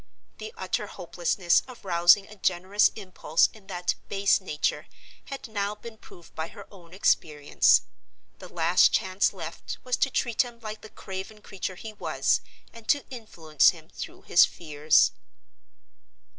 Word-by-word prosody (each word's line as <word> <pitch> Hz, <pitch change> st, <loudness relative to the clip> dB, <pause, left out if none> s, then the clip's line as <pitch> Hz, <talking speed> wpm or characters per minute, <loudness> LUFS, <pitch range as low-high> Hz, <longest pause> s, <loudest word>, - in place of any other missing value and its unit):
The 215 Hz, 0 st, -7 dB
utter 190 Hz, +2 st, -2 dB
hopelessness 175 Hz, 0 st, 0 dB
of 250 Hz, -5 st, -13 dB
rousing 175 Hz, +2 st, +5 dB
a 210 Hz, -, -13 dB
generous 190 Hz, +1 st, +2 dB
impulse 185 Hz, -5 st, +1 dB
in 210 Hz, -3 st, -18 dB
that 175 Hz, 0 st, -1 dB, 0.2 s
base 200 Hz, 0 st, +2 dB
nature 150 Hz, -5 st, -2 dB, 0.4 s
had 275 Hz, -2 st, -7 dB
now 205 Hz, -1 st, -3 dB
been 220 Hz, +1 st, -12 dB
proved 170 Hz, -2 st, -16 dB
by 160 Hz, 0 st, -4 dB
her 200 Hz, +3 st, -12 dB
own 175 Hz, -4 st, -16 dB
experience. 150 Hz, -6 st, +2 dB, 0.6 s
The -, -, -11 dB
last 170 Hz, +1 st, +4 dB
chance 190 Hz, +1 st, +1 dB
left -, -, -7 dB
was 250 Hz, -1 st, -1 dB
to -, -, +2 dB
treat 235 Hz, -3 st, +1 dB
him 240 Hz, -2 st, -6 dB
like 215 Hz, -1 st, -7 dB
the 215 Hz, -, -12 dB
craven 195 Hz, +2 st, -8 dB
creature 190 Hz, -1 st, -5 dB
he 215 Hz, +4 st, -9 dB
was, -, -, 0 dB, 0.3 s
and 230 Hz, -1 st, -14 dB
to 285 Hz, -2 st, +2 dB
influence 165 Hz, -, +2 dB
him 160 Hz, -2 st, -8 dB
through -, -, -9 dB
his 175 Hz, -, +6 dB
fears. 155 Hz, -2 st, +2 dB
190 Hz, 150 wpm, -26 LUFS, 170-215 Hz, 0.6 s, his